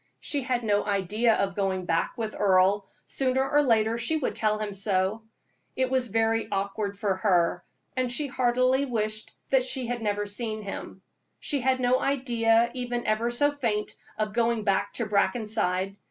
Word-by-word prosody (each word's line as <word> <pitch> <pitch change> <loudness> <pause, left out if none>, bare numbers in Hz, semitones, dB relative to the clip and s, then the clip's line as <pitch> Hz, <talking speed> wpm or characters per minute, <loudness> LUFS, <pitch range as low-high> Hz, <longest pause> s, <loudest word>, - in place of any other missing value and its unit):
She 285 - -2
had 250 -2 -1
no 205 -2 +2
idea 210 +3 +1
of 195 0 -1
going 190 -1 -1
back 165 -1 -1
with 220 -2 -3
Earle 195 0 +3 0.2
sooner 265 0 +1
or 295 +1 +3
later 225 -3 +2
she 315 +7 0
would 295 - -2
tell 215 -1 0
him 210 -1 -4
so. 195 +2 0 0.5
It 260 0 0
was 260 -1 +2
very 225 +1 0
awkward 200 +1 -2
for 200 -1 0
her, 180 -3 +2 0.3
and 255 -1 0
she 290 +5 -1
heartily 255 +1 +2
wished 215 -3 -2 0.3
she 260 0 -2
had 240 0 -3
never 205 -1 -1
seen 215 +1 -3
him. 195 - -7 0.4
She 285 -2 -1
had 260 +1 +2
no 255 +1 +3
idea, 235 -4 +2
even 245 -1 -3
ever 215 +2 +1
so 290 +5 +2
faint, 230 -7 -2 0.2
of 215 -1 -2
going 235 -1 +1
back 195 -1 +1
to 235 - -1
Brackenside. 200 -3 0
225 Hz, 170 wpm, -27 LUFS, 205-250 Hz, 0.5 s, Earle